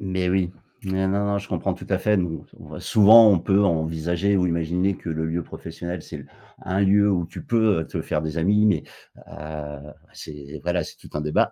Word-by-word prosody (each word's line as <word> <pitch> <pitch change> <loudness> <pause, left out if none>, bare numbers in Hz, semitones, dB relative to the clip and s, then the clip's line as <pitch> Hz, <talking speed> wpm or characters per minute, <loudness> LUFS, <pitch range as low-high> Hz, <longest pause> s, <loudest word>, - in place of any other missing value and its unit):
Mais 95 -2 -2
oui, 90 -1 0 0.3
non, 95 0 -1
non, 100 +1 0
je 100 - -9
comprends - - -2
tout - - -11
à - - +2
fait, 105 0 +2
non 90 -4 -2
on - - -13
va - - -8
souvent, 110 +1 +7
on 95 -5 +4
peut 95 +3 +2
envisager 85 +3 0
ou 90 -1 +2
imaginer 90 +3 0
que 85 - -7
le 80 0 -2
lieu 85 +2 -2
professionnel, 85 +2 -7
c'est 80 - -9
l 70 - -11 0.4
un 95 +1 -1
lieu 100 +1 +4
où 90 -3 0
tu - - -9
peux, 110 -6 +2
heu, 80 - -5
te - - -4
faire 75 - -2
des 80 +1 -4
amis, 105 +5 +3
mais, 90 -8 +2 0.5
heu, 75 -1 -8 0.2
c'est 75 0 -10
voilà, 85 -1 -1
c'est - - -11
tout - - -15
un 75 - -1
débat, 75 0 +1
90 Hz, 220 wpm, -23 LUFS, 80-100 Hz, 0.5 s, souvent